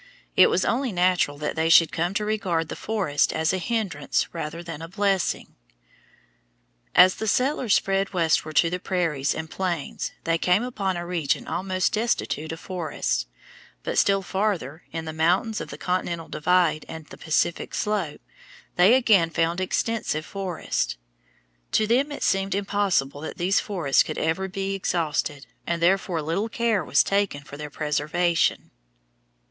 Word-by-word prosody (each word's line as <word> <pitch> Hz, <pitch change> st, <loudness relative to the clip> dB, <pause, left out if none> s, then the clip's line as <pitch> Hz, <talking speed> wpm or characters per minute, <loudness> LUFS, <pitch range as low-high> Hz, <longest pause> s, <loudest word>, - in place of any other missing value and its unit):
It -, -, +7 dB
was -, -, +1 dB
only 255 Hz, +1 st, 0 dB
natural 180 Hz, -5 st, +2 dB
that 150 Hz, +1 st, -3 dB
they 160 Hz, 0 st, +1 dB
should 165 Hz, -1 st, +7 dB
come 175 Hz, +4 st, -1 dB
to 210 Hz, 0 st, 0 dB
regard 180 Hz, -7 st, -1 dB
the -, -, -4 dB
forests 200 Hz, -10 st, 0 dB
as 160 Hz, +2 st, 0 dB
a 185 Hz, -, 0 dB
hindrance 195 Hz, -9 st, -1 dB
rather 165 Hz, 0 st, -5 dB
than 165 Hz, -2 st, -7 dB
a 165 Hz, -, -6 dB
blessing. 195 Hz, 0 st, -1 dB, 1.4 s
As 180 Hz, +1 st, +8 dB
the 220 Hz, -, -3 dB
settlers 255 Hz, -1 st, +2 dB
spread 195 Hz, 0 st, +1 dB
westward 160 Hz, -3 st, +1 dB
to 165 Hz, +2 st, +4 dB
the 180 Hz, -, -2 dB
prairies 165 Hz, -7 st, 0 dB
and 160 Hz, 0 st, -4 dB
plains 175 Hz, -3 st, -3 dB
they 165 Hz, 0 st, +1 dB
came 180 Hz, +6 st, +3 dB
upon 195 Hz, -7 st, -2 dB
a 175 Hz, -, -4 dB
region 170 Hz, -5 st, -1 dB
almost 185 Hz, 0 st, -1 dB
destitute 215 Hz, -8 st, -1 dB
of 165 Hz, -, -6 dB
forests; 155 Hz, -, -2 dB, 0.6 s
but -, -, 0 dB
still 195 Hz, -1 st, +3 dB
farther, 180 Hz, -7 st, -2 dB
in 165 Hz, 0 st, -4 dB
the 160 Hz, -, -5 dB
mountains 180 Hz, +8 st, +1 dB
of -, -, -7 dB
the -, -, -8 dB
continental 175 Hz, -2 st, -2 dB
divide 170 Hz, -1 st, +2 dB
and 160 Hz, -1 st, -8 dB
the -, -, -12 dB
Pacific 160 Hz, +1 st, 0 dB
slope, 205 Hz, -8 st, -2 dB, 0.6 s
they 190 Hz, +7 st, +7 dB
again 210 Hz, -10 st, +4 dB
found 165 Hz, +2 st, 0 dB
extensive 185 Hz, -5 st, -1 dB
forests. 185 Hz, -, -3 dB, 0.8 s
To 215 Hz, -, +3 dB
them 260 Hz, +7 st, +2 dB
it 290 Hz, -, -5 dB
seemed 195 Hz, 0 st, +1 dB
impossible 195 Hz, -9 st, 0 dB
that 160 Hz, -, -6 dB
these 180 Hz, +3 st, +2 dB
forests 175 Hz, -10 st, +2 dB
could -, -, -3 dB
ever 165 Hz, +5 st, 0 dB
be 195 Hz, +1 st, -3 dB
exhausted, 155 Hz, -6 st, -1 dB, 0.2 s
and 170 Hz, 0 st, 0 dB
therefore 175 Hz, -2 st, +1 dB
little 180 Hz, +9 st, -1 dB
care 230 Hz, -5 st, +1 dB
was 140 Hz, -1 st, +3 dB
taken 195 Hz, -8 st, 0 dB
for 145 Hz, -, -10 dB
their 150 Hz, +1 st, -6 dB
preservation. 155 Hz, +4 st, 0 dB
180 Hz, 160 wpm, -25 LUFS, 160-195 Hz, 1.4 s, As